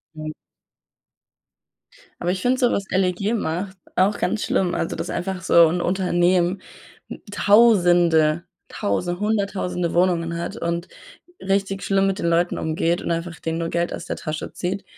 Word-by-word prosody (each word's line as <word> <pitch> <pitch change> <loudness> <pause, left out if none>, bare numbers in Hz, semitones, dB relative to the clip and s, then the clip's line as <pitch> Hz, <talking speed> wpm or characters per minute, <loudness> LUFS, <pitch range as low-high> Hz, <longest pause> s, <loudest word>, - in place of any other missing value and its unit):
Nein. 155 0 -6 1.9
Aber 175 - 0
ich 185 0 -3
finde 250 +3 +2
so, 245 -2 +3
was 200 - -1
LEG 190 +3 0
macht, 190 0 -3 0.2
auch 200 +3 +2
ganz 210 +4 -1
schlimm, 180 -2 0
also, - - -2
dass - - -5
einfach 190 0 -3
so 170 -1 +6
'n 175 +2 -1
Unternehmen, 180 0 +1 0.5
hm, - - -8
tausende, 175 -6 +4 0.2
tause 175 - -2
hunderttausende 200 -5 -1
Wohnungen 170 -2 +1
hat 170 - -4
und 170 +1 -2 0.5
richtig 195 0 -1
schlimm 195 0 +2
mit 195 +1 -1
den - - -1
Leuten 170 +1 +1
umgeht 165 +2 0
und - - -3
einfach 170 0 -3
denen 165 0 -3
nur 165 0 -2
Geld 170 0 -1
aus - - -6
der - - -3
Tasche 155 -1 -5
zieht. 190 +2 -3
180 Hz, 155 wpm, -22 LUFS, 170-195 Hz, 1.9 s, so